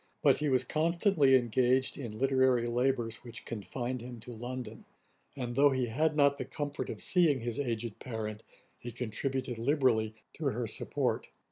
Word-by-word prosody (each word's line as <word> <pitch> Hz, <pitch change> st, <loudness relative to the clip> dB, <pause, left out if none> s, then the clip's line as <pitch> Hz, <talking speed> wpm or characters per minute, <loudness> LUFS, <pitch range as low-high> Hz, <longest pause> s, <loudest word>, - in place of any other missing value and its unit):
But -, -, +5 dB
he 150 Hz, -1 st, 0 dB
was 130 Hz, -1 st, +3 dB
constantly 160 Hz, -, +3 dB
engaged 130 Hz, +2 st, +2 dB
in 115 Hz, -6 st, -6 dB
literary 130 Hz, -2 st, +3 dB
labours 120 Hz, -1 st, 0 dB
which 120 Hz, -1 st, -8 dB
confined 120 Hz, +3 st, -4 dB
him 120 Hz, 0 st, -8 dB
to 120 Hz, -, -9 dB
London; 120 Hz, -1 st, -6 dB, 0.5 s
and 120 Hz, -3 st, -4 dB
though 145 Hz, +2 st, +6 dB
he 130 Hz, -2 st, 0 dB
had 155 Hz, +6 st, +1 dB
not 140 Hz, -1 st, +4 dB
the -, -, -1 dB
comfort 145 Hz, -1 st, -4 dB
of -, -, -5 dB
seeing 160 Hz, -8 st, +3 dB
his 120 Hz, +1 st, -3 dB
aged 115 Hz, -4 st, -3 dB
parent, 110 Hz, -4 st, -5 dB, 0.4 s
he 120 Hz, -, -7 dB
contributed 125 Hz, +2 st, -3 dB
liberally 115 Hz, -5 st, +2 dB, 0.2 s
to -, -, -6 dB
her -, -, 0 dB
support. -, -, -2 dB
125 Hz, 160 wpm, -31 LUFS, 115-140 Hz, 0.5 s, though